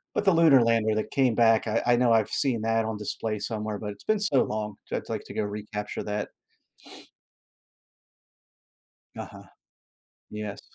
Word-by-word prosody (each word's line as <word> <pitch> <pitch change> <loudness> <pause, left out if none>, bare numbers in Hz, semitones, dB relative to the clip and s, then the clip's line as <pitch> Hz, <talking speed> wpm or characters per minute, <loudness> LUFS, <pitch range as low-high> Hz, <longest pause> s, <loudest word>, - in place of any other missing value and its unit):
but - - 0
the 195 - +5
Lunar 160 -6 +6
lander 115 -2 +2
that 110 - -2
came 130 -4 +2
back, 115 0 +3
I 110 +1 +1
I 120 - +5
know 120 -1 +3
I've 110 -2 +2
seen 130 -6 0
that 115 0 +1
on 110 -1 -3
display 105 +1 -3
somewhere, 110 -2 -4
but 105 -1 -5
it's 100 - -13
been 215 -1 +1
so 170 -11 +2
long, 105 -1 -4
so - - -4
I'd - - -5
like - - -3
to - - -9
go - - -1
recapture 105 0 -5
that. 105 0 -3 2.9
Uh-huh. - - -8 0.9
Yes. 105 -1 -6
110 Hz, 165 wpm, -27 LUFS, 105-120 Hz, 2.9 s, Lunar